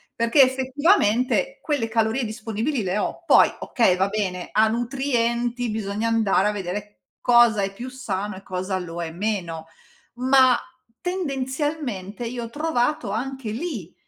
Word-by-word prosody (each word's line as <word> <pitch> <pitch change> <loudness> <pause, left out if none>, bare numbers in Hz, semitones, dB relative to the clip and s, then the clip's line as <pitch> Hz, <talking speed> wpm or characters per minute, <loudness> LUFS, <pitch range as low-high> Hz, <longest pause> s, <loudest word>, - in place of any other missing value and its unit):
perché, 230 +5 +4
effettivamente, 265 - +2
quelle 285 -7 -1
calorie 225 +3 +1
disponibili 225 +3 -2
le 185 +1 -1
ho. - - -3
Poi, - - +6
okay, 225 -7 +2
va 190 +2 +2
bene, 190 -4 -3
a 220 +1 +4
nutrienti, 240 -1 -1
bisogna 215 +1 -2
andare 210 -3 +2
a - - +1
vedere 205 +1 -5 0.2
cosa 240 -3 +5
è 195 0 -2
più 245 +6 -7
sano 210 -6 -4
e 195 - -12
cosa 185 +1 -3
lo 170 -1 -6
è 160 - -5
meno, 175 -4 -3 0.5
ma, 260 0 +5 0.4
tendenzialmente, 275 - -3
io 240 0 -4
ho - - -8
trovato 290 -4 -1
anche 255 +1 -4
lì, 230 - -5
230 Hz, 140 wpm, -23 LUFS, 205-260 Hz, 0.5 s, Poi